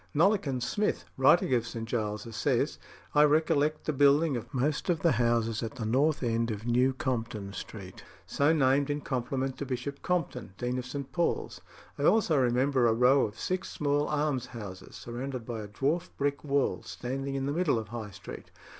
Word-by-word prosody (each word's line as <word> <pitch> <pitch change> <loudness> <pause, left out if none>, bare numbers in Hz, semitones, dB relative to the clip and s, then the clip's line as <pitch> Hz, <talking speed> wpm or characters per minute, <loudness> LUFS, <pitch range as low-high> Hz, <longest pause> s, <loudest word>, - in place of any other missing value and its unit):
"Nollekens" 155 - +2
Smith, 210 0 -1
writing 135 +1 +4
of 115 -2 +1
St. 115 -1 -5
Giles's, 110 -1 -3
says: 135 +2 0 0.3
"I 150 - +5
recollect 150 0 +2
the 155 - 0
building 145 +2 +4
of 120 0 -6
most 145 +5 -1
of 170 -2 +1
the 170 - +4
houses 115 -3 +1
at 115 -2 -5
the 115 - -4
north 140 +6 +2
end 115 0 0
of 110 0 -4
New 125 +2 +3
Compton 115 -6 -3
Street 95 -3 -8 0.2
so 145 +2 +2
named 140 -2 +3
in 145 0 -1
compliment 130 0 -2
to 140 - -3
Bishop 130 +2 -4
Compton, 140 - -2
Dean 125 +1 -2
of 125 - -6
St. 140 +1 -6
Paul's. 175 -1 -1 0.4
I - - -1
also 205 -6 +4
remember 130 0 +3
a 115 - +4
row 125 +4 +5
of 105 +1 -12
six 185 +7 -2
small 145 0 0
almshouses, 125 -10 -3
surrounded 125 0 -5
by 115 -2 -4
a 105 - -7
dwarf 145 - -1
brick 140 0 -1
wall, 140 -9 +1
standing 130 +10 -4
in 135 0 -1
the 140 - -1
middle 165 -6 +2
of 110 -2 -5
High 110 -2 -5
Street. 95 - -10
130 Hz, 180 wpm, -29 LUFS, 115-145 Hz, 0.4 s, I